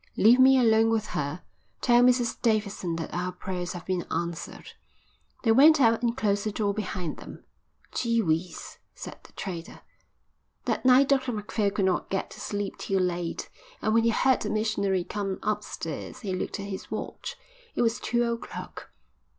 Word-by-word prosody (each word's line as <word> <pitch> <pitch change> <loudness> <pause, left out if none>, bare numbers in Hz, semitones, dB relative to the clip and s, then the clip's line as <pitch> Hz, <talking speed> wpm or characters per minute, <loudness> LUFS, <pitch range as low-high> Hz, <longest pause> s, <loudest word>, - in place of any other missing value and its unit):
"Leave 235 +4 +6
me 265 +1 +7
alone 225 -2 +4
with 225 -2 +1
her. 150 +4 -3 0.4
Tell 240 -1 +5
Mrs 245 -1 +3
Davidson 205 -7 0
that 165 -1 -5
our 180 +1 -2
prayers 180 -1 -4
have 175 -1 -8
been 185 -1 -1
answered." 170 -1 -4 0.7
They 225 - +4
went 295 +6 +7
out 230 -3 +4
and 240 0 0
closed 205 -4 +1
the 215 - -1
door 205 -1 0
behind 185 -5 -4
them. - - -11 0.5
"Gee 230 -1 0
whizz," 170 -2 -2 0.2
said - - -8
the - - -18
trader. 175 -4 -6 0.8
That - - -1
night 260 +2 +6
Dr 265 -2 +2
Macphail 210 -1 -1
could 200 -1 0
not 185 -2 0
get 195 - -2
to - - -11
sleep 205 -1 -4
till 195 -1 0
late, 175 -2 -2 0.3
and 215 - 0
when 230 - +5
he 230 - +4
heard 260 +3 +3
the - - -2
missionary 200 -4 0
come 195 +1 -3
upstairs 210 -7 -4
he 195 -4 -3
looked 185 - -3
at 200 - -5
his 195 -1 -6
watch. - - -5 0.4
It - - +2
was 230 0 +1
two 240 0 +1
o'clock. 235 0 -5
210 Hz, 175 wpm, -27 LUFS, 185-235 Hz, 0.8 s, me